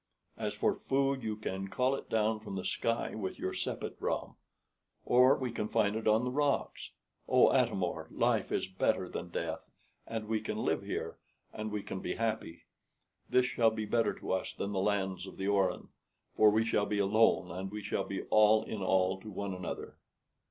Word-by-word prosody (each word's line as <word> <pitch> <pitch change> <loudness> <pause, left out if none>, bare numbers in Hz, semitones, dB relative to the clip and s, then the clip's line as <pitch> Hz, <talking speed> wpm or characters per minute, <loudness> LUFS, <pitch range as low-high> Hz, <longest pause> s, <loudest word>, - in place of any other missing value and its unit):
As - - -3
for - - +2
food, 135 0 0
you 110 -2 -2
can 95 -2 -4
call 130 +6 +1
it 135 - -5
down 110 0 +1
from 105 -2 -7
the 95 - -4
sky 115 0 -1
with 95 -4 -4
your 95 - -3
sepet - - -3
ram, - - -2 0.7
or 125 +3 +6
we 130 -2 -3
can 105 -2 -2
find 105 -1 +1
it 110 0 -2
on 110 +2 +4
the 125 - -1
rocks. 145 +1 0 0.4
Oh, - - +5
Atam - - +2
or! - - -3
life - - +1
is - - 0
better 95 0 0
than 90 0 -6
death, 85 -2 -4 0.4
and 110 -2 -4
we 110 0 0
can - - -4
live - - 0
here, - - -4 0.3
and 110 0 -4
we 105 -1 -3
can 95 - -5
be 90 - -3
happy. 110 -7 -3 0.7
This 125 0 +4
shall 120 -2 +3
be 110 -1 -4
better 115 +2 +1
to - - -6
us 95 0 -1
than 100 - -4
the 95 - -1
lands 95 -2 0
of - - -10
the 95 - -2
Orin, 100 -2 +1 0.5
for 110 - +7
we 110 +2 +2
shall 105 -2 +1
be 105 - -1
alone, 100 -3 +3
and 95 +3 -4
we 105 +1 -6
shall - - -1
be - - -4
all 110 0 +6
in 110 -2 -5
all 95 0 +2
to 110 - -9
one 100 -1 -4
another." 90 -1 -6
105 Hz, 200 wpm, -32 LUFS, 95-115 Hz, 0.7 s, for